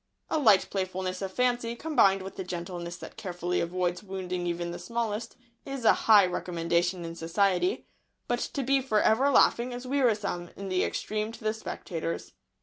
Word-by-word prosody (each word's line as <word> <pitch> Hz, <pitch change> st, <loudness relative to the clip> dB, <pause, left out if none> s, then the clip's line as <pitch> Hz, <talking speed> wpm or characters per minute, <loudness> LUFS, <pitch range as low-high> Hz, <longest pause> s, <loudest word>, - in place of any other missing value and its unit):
A 315 Hz, -, +2 dB
light 215 Hz, -9 st, +5 dB
playfulness 185 Hz, -1 st, -2 dB
of 190 Hz, -1 st, -3 dB
fancy, 245 Hz, +1 st, 0 dB
combined 200 Hz, -10 st, +3 dB
with 190 Hz, -, -8 dB
the 190 Hz, -, -4 dB
gentleness 175 Hz, -1 st, -5 dB
that -, -, -10 dB
carefully 180 Hz, -2 st, -2 dB
avoids 175 Hz, 0 st, -1 dB
wounding 185 Hz, -3 st, -4 dB
even 170 Hz, 0 st, -2 dB
the 175 Hz, -, -6 dB
smallest, 230 Hz, -2 st, -3 dB, 0.3 s
is 270 Hz, -3 st, -5 dB
a -, -, +8 dB, 0.2 s
high 205 Hz, -3 st, +9 dB
recommendation 175 Hz, 0 st, -1 dB
in 165 Hz, -, -5 dB
society; 195 Hz, -, +1 dB, 0.4 s
but 240 Hz, 0 st, 0 dB
to 275 Hz, -, -3 dB
be 270 Hz, +1 st, +3 dB
for 220 Hz, -5 st, +1 dB
ever 255 Hz, +8 st, +4 dB
laughing 245 Hz, -2 st, +4 dB
is 245 Hz, +1 st, -6 dB
wearisome 215 Hz, -10 st, 0 dB
in 195 Hz, -1 st, -6 dB
the 185 Hz, 0 st, +1 dB
extreme 215 Hz, +1 st, -2 dB
to 230 Hz, -, -12 dB
the 215 Hz, 0 st, +1 dB
spectators. 170 Hz, -6 st, -5 dB
195 Hz, 170 wpm, -28 LUFS, 175-235 Hz, 0.4 s, high